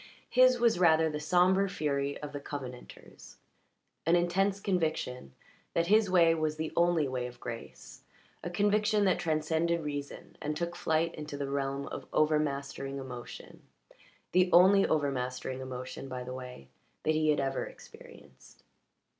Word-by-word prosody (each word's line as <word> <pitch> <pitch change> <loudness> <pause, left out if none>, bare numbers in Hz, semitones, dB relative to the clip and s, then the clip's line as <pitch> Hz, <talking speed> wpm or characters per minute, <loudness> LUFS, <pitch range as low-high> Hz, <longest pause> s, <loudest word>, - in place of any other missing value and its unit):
His 255 0 +5
was 235 -6 +3
rather 160 -2 +4
the 150 - -4
sombre 185 +5 +3
fury 140 -6 -1
of 145 0 -6
the 145 - -4
Covenanters 130 -3 -9 0.7
an 170 - +5
intense 190 +3 +1
conviction 160 - -2 0.4
that 170 - +2
his 215 -2 +4
way 170 -3 +5
was 155 -1 -1
the 160 0 -4
only 170 -3 +3
way 125 -1 -3
of 120 0 -12
grace 115 -1 -9 0.4
a - - -3
conviction 210 +3 +2
that 185 - +2
transcended 160 +1 0
reason 145 -1 -6
and 150 +1 -3
took 170 +2 -3
flight 165 -1 0
into 150 -2 -7
the 140 -1 -4
realm 140 0 -2
of - - -7
overmastering 140 -3 0
emotion 125 -3 -9 0.7
the 180 0 +3
only 190 +3 +6
overmastering 130 -3 -1
emotion, 130 +1 -7
by 125 -1 -5
the 125 +1 -7
way, 125 - -9 0.4
that 155 - +2
he 155 0 +1
had 150 - +3
ever 135 -1 -1
experienced. - - -16
155 Hz, 145 wpm, -30 LUFS, 135-175 Hz, 0.7 s, only